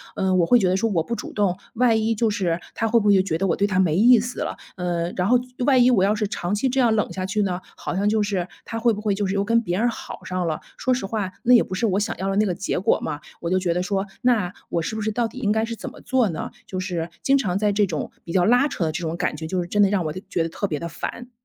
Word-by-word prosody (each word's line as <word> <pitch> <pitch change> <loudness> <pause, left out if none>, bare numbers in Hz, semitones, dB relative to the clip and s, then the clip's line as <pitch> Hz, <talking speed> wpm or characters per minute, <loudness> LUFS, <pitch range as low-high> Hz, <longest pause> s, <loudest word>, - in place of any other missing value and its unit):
嗯， 190 -1 +1
我 175 - +4
会 245 +7 +5
觉 185 - +2
得 185 - +2
说 225 +3 +1
我 170 -4 +2
不 235 - -3
主 - - -7
动， 195 -3 +1 0.2
万 230 -1 +3
一 225 +1 +1
就 225 +1 +1
是 180 -5 -1 0.2
他 225 - 0
会 235 +1 +4
不 210 - 0
会 205 - +6
就 190 - +5
觉 165 -4 -1
得 195 - +1
我 170 - +2
对 200 - +1
他 185 -2 0
没 170 -5 +3
意 235 +5 +6
思 240 +3 -4
了， - - -3 0.2
呃， 175 -1 -2
然 180 +1 +1
后 250 +1 +5 0.3
万 260 -3 +5
一 250 - +5
我 205 -7 +4
要 200 - +3
是 210 -1 -1
长 180 -1 -3
期 260 +6 +1
这 265 +2 0
样 235 -3 +4
冷 210 - 0
下 185 -1 -3
去 210 +3 0
呢， 185 -3 -1 0.2
好 - - -5
像 200 +2 +1
就 215 0 +2
是 195 -4 -1 0.2
他 225 - -5
会 230 -1 +3
不 210 - -5
会 210 -2 0
就 205 - -1
是 190 - -1
又 200 0 +1
跟 230 +2 +3
别 180 -3 -2
人 240 +2 +3
好 225 - -8
上 185 -1 -2
了。 155 -1 -2 0.2
说 255 - +1
实 245 -6 -2
话， 205 -3 -2
那 250 - +5
也 - - +6
不 - - -8
是 210 +5 +1
我 195 +1 +1
想 210 - -2
要 190 +1 -1
的 195 - -1
那 210 +2 +3
个 185 - 0
结 190 0 -2
果 190 - +2
嘛， 145 - -3 0.2
我 170 - -3
就 185 - +2
觉 180 -2 0
得 180 - 0
说， 195 +1 -1 0.2
那 220 -8 +2 0.2
我 170 - 0
是 220 - -3
不 220 - -3
是 215 +1 -1
到 235 +1 0
底 255 - -10
应 210 -5 +1
该 220 +1 +1
是 230 - -5
怎 - - -7
么 - - -14
做 255 -5 +1
呢？ 160 - -5 0.2
就 185 - -4
是 175 -3 -3
经 275 - +4
常 190 -9 0
在 210 0 +2
这 205 0 +3
种 155 -4 -4
比 165 - -7
较 180 -1 +3
拉 245 +6 +4
扯 190 - -3
的 160 - 0
这 170 +3 -4
种 165 0 -3
感 180 -3 -1
觉， 160 +1 -6
就 185 +2 -1
是 175 - -5
真 205 +3 +1
的 200 - +5
让 190 -5 0
我 155 - -2
的 185 - -7
觉 170 -3 0
得 165 - -3
特 200 +4 -3
别 150 - -2
地 170 - -4
烦。 240 +9 -6
200 Hz, 350 characters per minute, -23 LUFS, 180-225 Hz, 0.3 s, 会